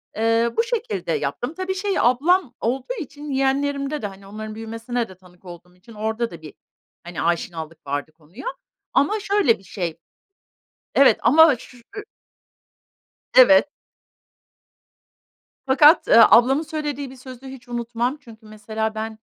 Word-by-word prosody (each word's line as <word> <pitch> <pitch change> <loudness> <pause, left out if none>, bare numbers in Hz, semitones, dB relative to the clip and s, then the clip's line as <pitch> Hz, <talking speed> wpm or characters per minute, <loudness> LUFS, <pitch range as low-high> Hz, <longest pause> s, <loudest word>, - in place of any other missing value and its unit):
Eee, 230 +1 +1
bu 460 - +4
şekilde 410 - -3
yaptım. 160 - -3
Tabii 375 +2 -4
şey, 395 0 -1
ablam 275 +4 +2
olduğu 255 - -2
için 290 -1 -8
yeğenlerimde 275 +2 -1
de 210 - -2
hani 195 0 -13
onların 215 +1 -8
büyümesine 225 +1 -4
de 185 - -12
tanık 180 0 -22
olduğum 180 0 -12
için 180 +6 -17
orada 220 +2 -3
da 170 -2 -11
bir, 155 - -11 0.5
hani, 175 -1 -6
aşinalık 165 -2 -3
vardı 145 +2 -3
konuya. 160 - -14 0.5
Ama 425 +10 +2
şöyle 400 - +2
bir - - -20
şey 175 -3 -5 1.0
Evet 270 -5 +5
ama 305 +4 +6
ş 250 - -15
ı 400 - -11 1.3
Evet. 245 -1 +7 2.0
Fakat, 295 +5 +5
ııı, 230 - +8
ablamın 265 +5 +5
söylediği 295 -4 -5
bir 265 - -12
sözü 255 0 -12
hiç 265 -2 -11
unutmam, 240 +2 -2
çünkü 225 -5 -16
mesela 220 +1 -4
ben, 220 0 -5
235 Hz, 140 wpm, -22 LUFS, 200-280 Hz, 2.0 s, ııı